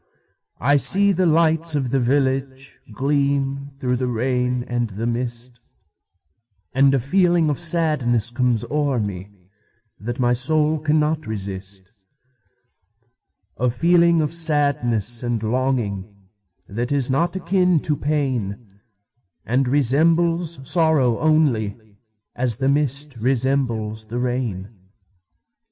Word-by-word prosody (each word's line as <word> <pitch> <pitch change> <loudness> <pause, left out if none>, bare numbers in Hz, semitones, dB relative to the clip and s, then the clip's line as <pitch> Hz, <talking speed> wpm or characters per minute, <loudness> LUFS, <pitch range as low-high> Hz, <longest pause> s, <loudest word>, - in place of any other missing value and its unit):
I 145 +4 +3
see 195 - +4
the 185 -1 +1
lights 160 0 +2
of 135 -4 -1
the 135 - +2
villageGleam 135 +1 -1
through 125 -2 -1
the 130 0 -2
rain 125 +1 -1
and 120 -1 -2
the 105 +3 -5
mist, 120 0 -4 1.1
And 135 +1 +4
a - - +2
feeling 170 +3 +2
of 145 - -3
sadness 150 - +1
comes 120 -2 0
o'er 145 -4 0
meThat 100 +4 -9
my 120 -2 +2
soul 150 +5 +2
cannot 155 0 0
resist:A 105 +3 -9
feeling 170 +5 +3
of 150 +1 -2
sadness 140 -9 +1
and 120 -3 -2
longing, 110 -4 -1 0.6
That 120 +5 -4
is 135 -3 +1
not 170 +8 0
akin 180 -1 +2
to 150 - 0
pain, 120 -9 -3 0.7
And 125 +3 +1
resembles 160 +3 +1
sorrow 155 -9 +2
onlyAs 110 -5 -2
the 135 +1 0
mist 140 -1 -1
resembles 120 -3 -1
the 115 +3 -6
rain. 120 -6 -3
130 Hz, 105 wpm, -21 LUFS, 115-150 Hz, 1.1 s, see